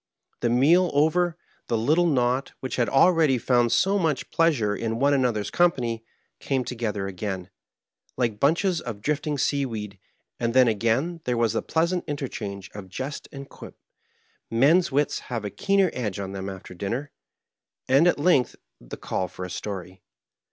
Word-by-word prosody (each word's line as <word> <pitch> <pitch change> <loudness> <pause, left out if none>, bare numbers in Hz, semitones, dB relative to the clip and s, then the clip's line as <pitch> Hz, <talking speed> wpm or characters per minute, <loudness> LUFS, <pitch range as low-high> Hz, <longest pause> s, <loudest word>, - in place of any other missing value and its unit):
The 120 - 0
meal 160 +9 +4
over, 165 +3 +2 0.3
the 115 - 0
little 155 +10 +3
knot, 130 -2 +1
which 130 - -4
had 120 - +1
already 155 -2 +4
found 120 0 +2
so 200 +1 +3
much 160 -6 -1
pleasure 135 -12 +2
in 115 +2 -2
one 140 +3 +3
another's 125 -6 0
company, 120 -10 +1 0.4
came 130 -2 -1
together 110 -5 -3
again, 95 -1 -5 0.7
like 115 -4 0
bunches 170 - +2
of 115 -7 -6
drifting 150 +5 -1
seaweed, 115 -8 -2 0.4
and 115 0 -1
then 130 -1 +6
again 115 - 0
there 125 -1 0
was 115 -2 +2
the - - 0
pleasant 170 +2 0
interchange 105 -9 -5
of 100 -2 -9
jest 130 +10 -5
and 140 0 -9
quip - - -12 0.7
men's 145 +9 +4
wits 145 +2 +1
have 115 -4 -3
a 100 - -4
keener 195 -2 +2
edge 105 -6 -3
on 95 -1 -4
them 95 0 -5
after 95 -1 -9
dinner 115 +10 -4 0.4
— - - -66
^and 135 +6 +5
at 175 - +3
length 145 -5 +2 0.2
the - - -9
call 95 - -2
for 90 +1 -7
a 90 - -8
story. 95 -1 -6
125 Hz, 165 wpm, -25 LUFS, 105-150 Hz, 0.7 s, then